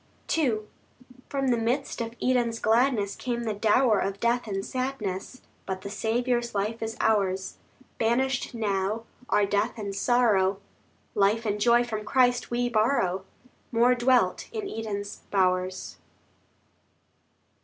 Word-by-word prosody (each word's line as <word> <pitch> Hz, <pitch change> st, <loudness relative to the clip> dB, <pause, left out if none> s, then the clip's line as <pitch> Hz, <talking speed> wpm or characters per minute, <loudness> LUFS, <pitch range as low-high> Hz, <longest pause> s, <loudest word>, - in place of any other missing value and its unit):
II 250 Hz, -10 st, +1 dB, 0.7 s
From 275 Hz, -2 st, 0 dB
the 240 Hz, -, +3 dB
midst 240 Hz, +4 st, -1 dB
of 230 Hz, 0 st, -5 dB
Eden's 240 Hz, -2 st, +1 dB
gladness 225 Hz, -2 st, +2 dB
Came 240 Hz, -1 st, -3 dB
the 220 Hz, -2 st, -1 dB
dower 215 Hz, +1 st, +3 dB
of 200 Hz, 0 st, -2 dB
death 235 Hz, +1 st, +1 dB
and 195 Hz, -1 st, -3 dB
sadness, 255 Hz, -4 st, -4 dB, 0.2 s
But 190 Hz, -1 st, -3 dB
the 200 Hz, -, -6 dB
Saviour's 235 Hz, +2 st, -1 dB
life 215 Hz, +3 st, -1 dB
is 225 Hz, +1 st, -4 dB
ours. 190 Hz, -3 st, 0 dB, 0.4 s
Banished 255 Hz, +3 st, 0 dB
now 205 Hz, 0 st, -1 dB, 0.3 s
are 205 Hz, -, +3 dB
death 205 Hz, +4 st, 0 dB
and 200 Hz, -2 st, -4 dB
sorrow; 200 Hz, -4 st, +2 dB, 0.5 s
Life 210 Hz, +3 st, +2 dB
and 210 Hz, -1 st, -1 dB
joy 240 Hz, +2 st, +5 dB
from 220 Hz, -3 st, -4 dB
Christ 245 Hz, 0 st, +2 dB
we 245 Hz, 0 st, 0 dB
borrow, 215 Hz, -5 st, +1 dB, 0.5 s
More 240 Hz, +1 st, +4 dB
dwelt 250 Hz, 0 st, +2 dB
in 430 Hz, -3 st, -4 dB
Eden's 205 Hz, -, -5 dB
bowers. 185 Hz, -1 st, 0 dB
225 Hz, 130 wpm, -27 LUFS, 200-245 Hz, 0.7 s, joy